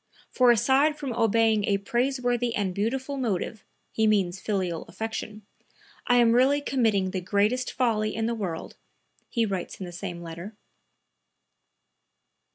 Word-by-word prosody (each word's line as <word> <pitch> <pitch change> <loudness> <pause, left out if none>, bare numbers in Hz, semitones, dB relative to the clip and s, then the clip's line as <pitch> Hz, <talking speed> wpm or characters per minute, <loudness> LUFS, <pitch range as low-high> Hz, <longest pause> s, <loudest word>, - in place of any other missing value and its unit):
"For 250 -1 +4
aside 270 +6 +4
from 280 -5 -4
obeying 225 -2 +2
a 200 0 +2
praiseworthy 245 +2 0
and 195 -3 -1
beautiful 260 +8 -2
motive" 220 -3 -2 0.3
(he 220 0 +1
means 195 -4 +1
filial 185 -6 -2
affection), 220 -1 -6 0.6
"I 245 - +4
am 240 -2 +5
really 260 +4 +4
committing 220 -9 +1
the 185 - -3
greatest 210 +7 +1
folly 215 -4 0
in 225 0 -1
the 235 - 0
world," 185 -8 -5 0.5
he 230 -1 +1
writes 190 -4 -4
in 190 - -5
the 175 - -8
same 175 -1 -6
letter.) 170 +6 -8
220 Hz, 140 wpm, -26 LUFS, 195-245 Hz, 0.6 s, am